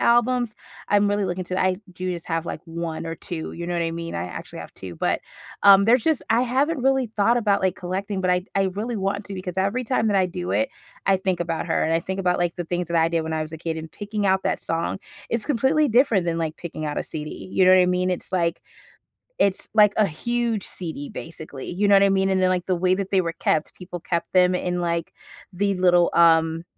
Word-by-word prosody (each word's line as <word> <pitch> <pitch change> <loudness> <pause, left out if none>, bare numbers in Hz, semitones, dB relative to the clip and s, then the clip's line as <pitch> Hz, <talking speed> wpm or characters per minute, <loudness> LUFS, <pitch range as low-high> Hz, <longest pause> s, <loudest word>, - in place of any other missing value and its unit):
albums. 240 -1 +2 0.3
I'm 205 0 +3
really 205 0 +1
looking 185 0 -2
to 185 +1 -2
I 185 0 +2 0.2
do 185 +1 -3
just 170 -2 -7
have, 165 0 -1
like, - - -5
1 165 -1 -5
or 165 - -4
2, 165 -1 -6
you 170 0 -6
know 175 - -2
what 170 - 0
I 165 - -1
mean? 165 0 -5
I 85 - -2
actually 90 - -8
have - - -10
2, 90 -2 -8
but, - - 0 0.4
um, 200 -1 +9
there's 235 +1 +4
just 320 -4 +1
I 230 +2 +4
haven't 270 +5 +1
really 265 -1 +2
thought 220 +3 +3
about, 210 -4 +2
like, 190 -1 +1
collecting, 190 +2 -3
but 185 -1 +1
I 180 0 +1
I 195 - +2
really 225 +4 -3
want 200 +1 -2
to, 200 - -6
because 185 -1 -5
every 200 +7 0
time 225 -2 +1
that 205 - +2
I 190 -1 +3
do 180 0 -4
it, 275 - +1 0.4
I 195 - +5
think 185 -2 -1
about 165 -2 -2
her, - - +1
and 160 - +1
I 165 - +3
think 190 +2 -4
about, 180 -1 +1
like, 175 -1 0
the 175 - -2
things 175 +1 -2
that 170 - 0
I 165 0 +4
did 165 -1 0
when 160 0 -4
I 155 - -1
was 155 - -7
a 160 - -6
kid 165 0 -3
and 160 0 -7
picking 205 0 -3
out 190 0 +2
that - - 0
song 165 +3 -2 0.3
is 230 -2 -1
completely 290 +3 +2
different 230 -5 +3
than, 165 -1 -1
like, 160 -2 -2
picking 155 -2 -6
out 150 - -3
a - - -1
CD, 155 +2 -7
you 190 - +4
know 185 - +7
what 185 0 +7
I - - +2
mean? 180 0 +1
It's 180 - -4
like 170 -2 0 0.8
it's, 195 -2 +1
like, 210 -2 +6
a 215 - +5
huge 230 +5 -2
CD 160 -5 -6
basically, 155 -4 -8
you 200 +4 0
know 200 - +5
what 195 - +6
I 200 - +4
mean? 195 0 +2
And 190 - +2
then, 185 - +4
like, 180 -1 0
the 185 - +2
way 185 +1 +2
that 195 0 -4
they 190 -2 +4
were 165 -2 -3
kept, 155 -1 -1
people 180 -1 -8
kept 170 0 -3
them 180 0 +4
in, 180 0 -1
like, 170 -1 -2 0.4
the 200 +2 0
little, 180 -1 +4
um 165 -1 +4
185 Hz, 255 wpm, -23 LUFS, 170-205 Hz, 0.8 s, um